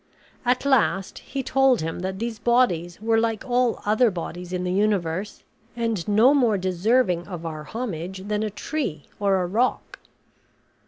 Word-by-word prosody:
At 250 +2 +1
last 225 -8 +1
he 270 0 -5
told 270 -3 +3
him 165 +2 -3
that 190 +1 -3
these 225 0 -4
bodies 205 -8 +1
were 225 +1 +2
like 225 0 -1
all 245 -1 +1
other 220 +3 +4
bodies 175 -1 -6
in 180 -1 -2
the 180 - -1
universe, 195 -1 -1 0.3
and 230 -6 -2
no 220 +6 +5
more 240 -7 +3
deserving 185 0 +1
of 175 -4 -7
our 155 -2 -5
homage 190 -3 -5
than 210 0 -1
a 215 - -1
tree 205 - -4
or 200 -2 +2
a - - -1
rock. 225 +8 -1
210 Hz, 160 wpm, -24 LUFS, 180-240 Hz, 0.3 s, no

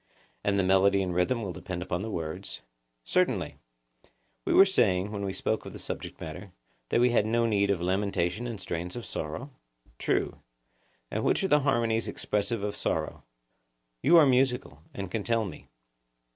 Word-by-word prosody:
And 100 0 +2
the 95 - +3
melody 95 +1 +4
and 90 -1 -2
rhythm 110 +7 +1
will 95 -3 -4
depend 90 0 -5
upon 90 0 -2
the 110 - -4
words? 80 -6 -5 0.4
Certainly. - - 0 0.9
We - - 0
were 195 - +8
saying, 100 - +2
when 100 -2 -4
we 100 - -1
spoke 110 +3 -1
of - - -9
the - - -7
subject - - -6
matter, 90 +4 -8 0.4
that - - +2
we 125 0 +4
had 110 -3 +3
no 115 +1 +2
need 100 -3 +2
of 95 -4 +1
lamentation 95 +3 0
and 115 -4 -5
strains 90 -1 -4
of 120 - -6
sorrow? 80 - -5 0.5
True. - - 0 0.7
And - - -1
which - - +2
are - - +2
the 150 - +6
harmonies 115 -5 +1
expressive 105 +1 -1
of 105 0 -2
sorrow? - - -2 0.8
You 170 +5 +6
are 160 - +8
musical, 125 - +1
and 100 -2 -6
can 110 -3 -2
tell 115 0 +1
me. 90 -6 -9
100 Hz, 175 wpm, -28 LUFS, 90-115 Hz, 0.9 s, were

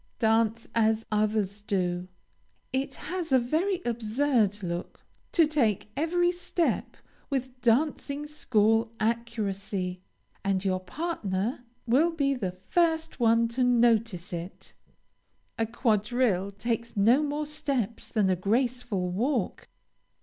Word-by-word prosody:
Dance 225 0 +2
as 220 0 +2
others 210 -1 0
do. 180 -3 -1 0.7
It 270 +1 -1
has 345 -1 -5
a 260 - +7
very 335 +10 0
absurd 230 -2 +1
look 170 0 -5 0.3
to 335 - +5
take 230 -9 0
every 350 +3 +2
step 350 -1 -1 0.3
with 260 -2 -3
dancing 280 +3 +1
school 225 -6 +2
accuracy, 205 -5 -2 0.4
and 195 0 0
your 185 -1 +1
partner 220 - -3 0.2
will 270 +8 +4
be 285 -4 +1
the 190 -8 -4
first 325 -3 +1
one 230 0 +4
to 250 +2 0
notice 230 -7 +2
it. 170 +2 -7 0.9
A 225 - +1
quadrille 215 -3 +1
takes 230 +3 -3
no 230 +8 +5
more 300 0 -1
steps 280 -7 -3
than 215 -4 +2
a - - +3
graceful 220 -1 0
walk. 235 +2 -1
230 Hz, 115 wpm, -28 LUFS, 205-275 Hz, 0.9 s, a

